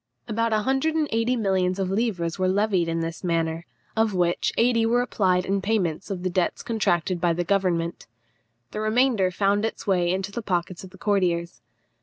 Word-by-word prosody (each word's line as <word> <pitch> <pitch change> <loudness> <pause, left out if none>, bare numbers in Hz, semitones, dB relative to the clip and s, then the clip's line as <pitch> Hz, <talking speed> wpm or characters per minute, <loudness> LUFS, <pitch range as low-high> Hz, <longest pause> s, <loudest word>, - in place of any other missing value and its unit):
About 230 0 0
a 215 -1 +1
hundred 270 +5 +1
and 310 -2 +1
eighty 230 +3 +1
millions 190 -4 +1
of 190 -1 -1
livres 195 -6 -1
were 185 - +2
levied 190 -2 +1
in 165 0 -1
this 165 +2 -5
manner, 165 -1 -1 0.3
of 220 -2 +1
which 175 -1 +1
eighty 230 -1 +3
were 240 +2 +2
applied 185 -6 +1
in 195 0 0
payment 195 -5 -1
of 185 -3 -4
the 185 - 0
debts 180 0 -1
contracted 185 - 0
by 170 -1 +2
the 175 +1 -1
government. 175 -3 -1 0.6
The 215 - -4
remainder 215 -3 +2
found 200 +3 +1
its 225 - -3
way 180 -3 +2
into 190 +2 -2
the 235 - -4
pockets 180 -3 -2
of 190 - -9
the 190 - -16
courtiers. 175 - 0
190 Hz, 190 wpm, -24 LUFS, 175-220 Hz, 0.6 s, eighty